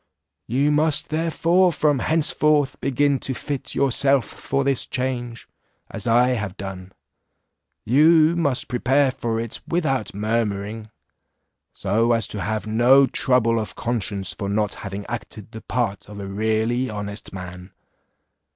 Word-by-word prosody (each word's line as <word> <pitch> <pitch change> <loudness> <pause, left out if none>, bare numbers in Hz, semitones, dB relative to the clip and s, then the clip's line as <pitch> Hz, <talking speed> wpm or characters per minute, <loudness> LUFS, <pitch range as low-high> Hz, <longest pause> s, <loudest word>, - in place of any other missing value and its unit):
You 140 +5 +1
must 150 0 +1
therefore 165 +3 +2
from 150 -4 +1
henceforth 150 -2 +1
begin 140 +1 +1
to 130 - -3
fit 140 +1 -5
yourself 135 0 +2
for 140 0 -3
this 135 -2 +1
change, 120 -2 -4 0.4
as - - -6
I 120 +2 +4
have 105 -6 -3
done; 95 -1 -7 0.9
you 155 +6 +5
must 145 -7 0
prepare 130 +2 +2
for 115 -3 -3
it 115 -1 -5
without 135 - -1
murmuring, 105 0 -2 0.8
so 115 +5 +1
as 115 -3 +1
to 105 - -4
have 110 +4 -2
no 120 +5 +5
trouble 115 -3 +2
of 110 - -5
conscience 105 -4 -2
for 100 - -5
not 105 0 0
having 100 0 -7
acted 115 -3 -7
the 110 - -9
part 110 -6 -3
of 105 -1 -9
a 100 - -5
really 110 +5 0
honest 105 0 -6
man. 90 0 -8
120 Hz, 135 wpm, -22 LUFS, 105-140 Hz, 0.9 s, you